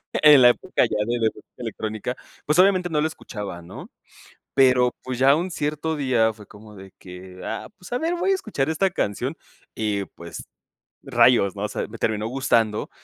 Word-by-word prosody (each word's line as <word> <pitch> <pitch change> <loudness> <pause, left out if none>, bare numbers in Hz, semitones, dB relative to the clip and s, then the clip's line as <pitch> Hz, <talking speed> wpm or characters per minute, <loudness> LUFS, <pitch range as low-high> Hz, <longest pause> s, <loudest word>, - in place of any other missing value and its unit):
en 150 -4 +7
la 120 - +9
época 155 +3 0
ya 105 - -3
de 120 0 -1
la 115 - +1
elect 110 - -1 0.2
electrónica, 110 0 -5 0.3
pues, 150 +4 +1
obviamente 185 -1 +4
no 150 -2 +1
lo 155 - +1
escuchaba, 105 - -7
¿no? 85 - -11 0.6
Pero, 125 -2 +4
pues, 130 -1 -5
ya 135 +2 +6
un 180 +3 -2
cierto 155 0 -2
día 120 -6 +2
fue 105 -1 -14
como 105 0 -14
de 95 -1 -12
que, 90 0 -11
ah, 110 - -5
pues, 180 - -14
a 245 - 0
ver, 330 +4 -1
voy 370 +3 0
a - - +4
escuchar 160 - -2
esta 190 +5 +1
canción 130 - -2 0.4
y, 105 -2 -1
pues, 85 -1 -10 0.6
rayos 105 -6 +4
¿no? 100 - -5
O 105 - 0
sea, - - -4
me 115 +1 -10
terminó 110 0 -1
gustando 115 -4 0
125 Hz, 195 wpm, -23 LUFS, 105-150 Hz, 0.6 s, la